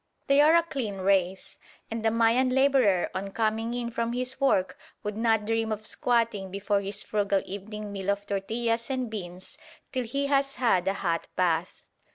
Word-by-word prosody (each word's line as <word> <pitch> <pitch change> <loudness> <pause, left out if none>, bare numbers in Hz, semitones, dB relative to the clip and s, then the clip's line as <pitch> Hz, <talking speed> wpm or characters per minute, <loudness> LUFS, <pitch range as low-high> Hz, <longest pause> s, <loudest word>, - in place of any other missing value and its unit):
They 275 +1 +5
are 310 +3 +6
a 335 - +5
clean 260 -11 -4
race, 190 -1 0 0.3
and 225 0 -3
the 225 - +4
Mayan 230 +3 +3
labourer 260 -8 +3
on 195 +1 -3
coming 225 +3 -1
in 240 -1 -3
from 230 0 -2
his 255 +2 -3
work 190 -9 +2 0.3
would 210 0 -3
not 225 -1 +2
dream 225 0 0
of 215 0 -4
squatting 230 -6 0
before 200 +1 0
his 200 +1 -5
frugal 200 -2 0
evening 205 +2 -7
meal 195 -1 -4
of 200 0 0
tortillas 230 +4 -1
and 255 -4 -2
beans 185 -3 -7 0.3
till 255 -3 -2
he 275 +5 -1
has 275 -1 +1
had 190 -8 +2
a 195 - +1
hot 170 -4 -1
bath. 175 -1 0
220 Hz, 180 wpm, -27 LUFS, 195-245 Hz, 0.3 s, are